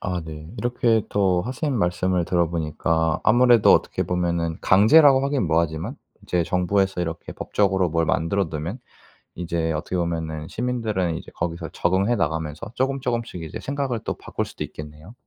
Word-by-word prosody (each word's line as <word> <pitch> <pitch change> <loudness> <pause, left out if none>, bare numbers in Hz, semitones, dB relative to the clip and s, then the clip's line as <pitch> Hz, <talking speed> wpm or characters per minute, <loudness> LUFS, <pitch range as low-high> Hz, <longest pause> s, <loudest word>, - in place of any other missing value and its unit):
아 90 -3 -2
네. 75 0 -9
이렇게 120 -2 +1
또 95 -3 +2
선생님 130 +2 -2
말씀을 90 0 +1
들어보니까 80 -2 0
아무래도 120 -1 +6
어떻게 - - +1
보면 85 -2 -1
강제라고 135 +7 +6
하긴 140 -8 0
뭐하지만 80 -1 0 0.3
이제 90 -2 0
정부에서 95 +2 +1
이렇게 85 -1 -4
법적으로 95 -3 +1
뭘 80 0 0
만들어 85 +4 0
두면 80 - -5 0.6
이제 85 -1 -2
어떻게 80 +4 -3
보면은 80 -3 -2
시민들은 110 -9 -1
이제 - - -11
거기서 85 0 -4
적응해 95 +7 +1
나가면서 80 +4 -3
쪼금쪼금씩 125 -7 -2
이제 80 - -7
생각을 135 -4 -2
또 - - -3
바꿀 - - -4
수도 - - -6
있겠네요. 75 +6 -11
90 Hz, 385 characters per minute, -23 LUFS, 80-115 Hz, 0.6 s, 아무래도